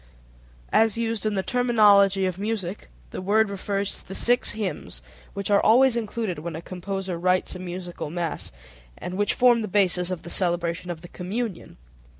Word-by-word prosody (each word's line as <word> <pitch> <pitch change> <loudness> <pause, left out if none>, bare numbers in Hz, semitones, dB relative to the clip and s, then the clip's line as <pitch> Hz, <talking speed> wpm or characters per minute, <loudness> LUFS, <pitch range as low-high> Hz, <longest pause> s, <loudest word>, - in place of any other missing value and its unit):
As 225 0 +4
used 225 -2 -1
in 210 - -1
the 190 - 0
terminology 205 -6 +4
of 185 0 -2
music 205 - -4 0.2
the - - -5
word 210 +2 +2
refers 200 0 -2
to - - -17
the 190 - -7
six 245 +1 +2
hymns 210 -3 -5 0.3
which 200 0 -2
are 200 - +5
always 250 +3 +5
included 220 -5 -3
when 165 +1 -5
a - - -4
composer 185 -1 -4
writes 185 +1 +1
a - - -7
musical 175 -3 -6
mass, 170 0 -3 0.5
and 180 - -6
which 205 +1 +1
form 240 -2 +5
the 215 - -3
basis 185 -3 +1
of 180 -3 -4
the 170 - -8
celebration 175 -1 0
of 165 -2 -5
the 175 - -10
Communion. 195 +3 -5
195 Hz, 175 wpm, -25 LUFS, 180-220 Hz, 0.5 s, are